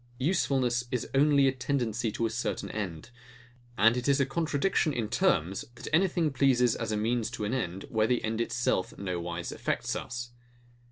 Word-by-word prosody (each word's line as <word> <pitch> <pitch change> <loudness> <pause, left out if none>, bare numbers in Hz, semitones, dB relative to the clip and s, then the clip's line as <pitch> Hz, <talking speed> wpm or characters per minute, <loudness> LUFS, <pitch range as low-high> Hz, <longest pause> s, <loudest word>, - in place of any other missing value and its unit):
Usefulness 130 -5 +1
is 125 -2 -2
only 140 0 +5
a - - +4
tendency 120 -4 -1
to 115 - -1
a - - +1
certain 125 +2 -3
end; 95 -1 -5 0.7
and 115 +3 +5
it 125 +1 -2
is 140 0 +4
a 140 - +3
contradiction 155 +2 0
in 115 -5 -1
terms, 95 - +1
that - - -9
anything 170 -3 +2
pleases 125 -3 +3
as - - -3
means 115 +1 0
to 110 -3 -4
an 105 - -2
end, 95 -7 -2
where 110 -1 +1
the 125 0 +1
end 110 +1 -1
itself 120 -5 -1
no 90 -3 -3
wise 85 0 -4
affects - - -2
us. 120 0 -5
120 Hz, 175 wpm, -29 LUFS, 110-135 Hz, 0.7 s, only